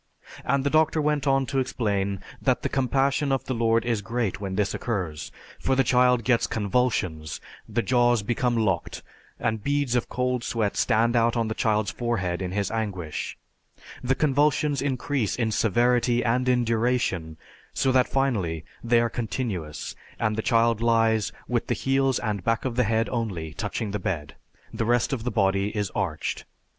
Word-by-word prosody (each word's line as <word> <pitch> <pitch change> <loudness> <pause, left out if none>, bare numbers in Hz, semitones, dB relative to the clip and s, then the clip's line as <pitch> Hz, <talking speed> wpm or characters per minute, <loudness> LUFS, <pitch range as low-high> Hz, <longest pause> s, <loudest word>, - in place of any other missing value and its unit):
And 140 +1 +1
the 140 - 0
doctor 155 0 +3
went 150 -2 0
on 135 0 +3
to 135 0 -1
explain 100 -6 -1 0.2
that - - +1
the - - 0
compassion 135 +2 +1
of 135 - +1
the 130 - -2
Lord 115 -1 +2
is 115 -3 0
great 115 -2 -2
when 95 -2 -3
this 100 -1 0
occurs, 90 -10 -3 0.3
for 135 - +1
the 135 - +4
child 125 -1 +3
gets 120 0 +2
convulsions, 100 -8 -1 0.3
the 120 - 0
jaws 120 -3 +3
become 120 +2 0
locked, 95 -6 -1 0.4
and 110 -2 -1
beads 145 -3 0
of 120 - 0
cold 125 -1 -1
sweat 110 -4 -1
stand 115 +2 +2
out 115 0 +3
on 115 -1 0
the - - -1
child's 110 -5 +1
forehead 95 -6 -2
in 90 -1 -3
his 100 0 -1
anguish; 95 -8 -3 0.6
the 130 +1 +1
convulsions 145 0 +2
increase 135 -4 -1
in 115 -3 0
severity 120 +3 +2
and 125 +2 +1
in 125 -1 +3
duration 115 -9 0 0.3
so 135 - +1
that 130 -1 +3
finally 100 - 0 0.2
they 115 0 +4
are 120 - +2
continuous 110 - -4 0.2
and 110 0 +1
the 110 - -1
child 115 -2 +2
lies 115 -2 +2 0.2
with - - -1
the - - 0
heels 135 -1 +1
and 105 -4 -2
back 115 +4 0
of 125 -3 -2
the 125 - +2
head 110 +1 +1
only 95 -10 -3
touching 105 +6 -3
the 105 - -2
bed, 75 -6 -3 0.4
the - - -1
rest 120 +5 +1
of 120 -3 -3
the 125 - 0
body 100 -1 +1
is 105 -2 -1
arched. 80 -5 -2
115 Hz, 175 wpm, -25 LUFS, 100-125 Hz, 0.6 s, the